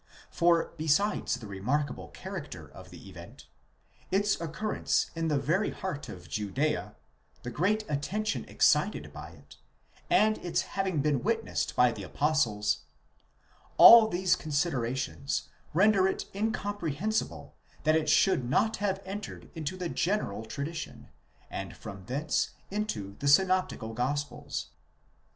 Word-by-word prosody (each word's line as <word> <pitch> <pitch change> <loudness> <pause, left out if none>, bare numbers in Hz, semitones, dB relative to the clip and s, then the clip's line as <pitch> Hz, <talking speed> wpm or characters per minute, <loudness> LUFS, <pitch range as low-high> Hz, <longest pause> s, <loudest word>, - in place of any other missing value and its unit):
For 170 -1 +2
besides 160 +6 +1
the 125 -3 -9
remarkable 125 +9 -2
character - - -8
of - - -13
the - - -12
event, - - -12 0.6
its 200 -1 +1
occurrence 170 +6 -1
in 165 0 -1
the 150 -2 +2
very 165 +9 +1
heart 175 -7 -5
of 90 -2 -10
Judea, 105 - -2 0.5
the 125 - -5
great 205 - +1
attention 195 +9 -2
excited - - +2
by - - -8
it, - - -17 0.5
and 215 -11 +4
its 175 - 0
having 190 -6 -1
been 145 -3 +1
witnessed 225 +1 -1
by 125 -1 +5
the - - -7
apostles,—all 115 - +3
these 180 -2 +2
considerations 140 -4 -2 0.2
render 195 +2 +4
it 190 - -2
incomprehensible 205 - -2 0.3
that 155 +1 +4
it 155 -1 +1
should 155 -8 +3
not 220 - +2
have 195 -1 -1
entered 200 +2 -7
into 160 +2 -4
the 180 -1 -3
general 170 - -1
tradition, 145 +8 -6 0.4
and - - -6
from 95 -2 -9
thence 145 - -1 0.2
into 110 - -3
the 140 - -2
synopti 185 +5 +3
cal 110 0 -6
gospels. 145 +5 -3
160 Hz, 125 wpm, -29 LUFS, 130-195 Hz, 0.6 s, by